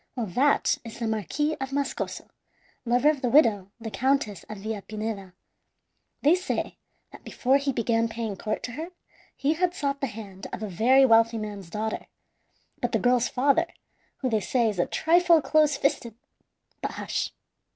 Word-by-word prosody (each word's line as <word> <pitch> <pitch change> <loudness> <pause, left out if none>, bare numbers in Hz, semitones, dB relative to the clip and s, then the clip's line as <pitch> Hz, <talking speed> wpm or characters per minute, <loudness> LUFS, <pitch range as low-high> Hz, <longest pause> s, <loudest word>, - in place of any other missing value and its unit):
Well, 240 -3 -2
that 260 +10 +2
is 230 -2 -9
the 235 - -3
Marquis 220 - -1
of 265 0 -3
Mascoso, 280 0 -3 0.6
lover 245 +5 +4
of 290 -3 -6
the 250 - +1
widow, 220 -8 +4
the 225 -1 -6
Countess 255 -7 0
of 215 - -6
Villapineda. 210 -1 -5 0.9
They 295 +4 +6
say 365 +1 -2 0.3
that - - -13
before 265 +2 +2
he 280 0 -1
began 230 -1 +1
paying 225 -2 -4
court 215 +3 -3
to 245 - -4
her 315 +7 -6 0.5
he 285 +3 +1
had 355 +2 0
sought 280 -1 -2
the 275 - 0
hand 205 -3 -9
of - - -5
a - - -2
very 250 +8 +4
wealthy 230 -1 +4
man's 205 -4 -6
daughter, 220 +3 -3 0.7
but - - -1
the - - +4
girl's 245 -1 +2
father, 280 +6 +2 0.5
who 260 - 0
they 220 - +2
say 240 +2 +1
is 200 -4 -4
a - - +2
trifle 340 0 +4
close 305 -1 +3
fisted 235 -5 -1 0.7
but - - -3
hush! - - -3
240 Hz, 170 wpm, -26 LUFS, 215-280 Hz, 0.9 s, They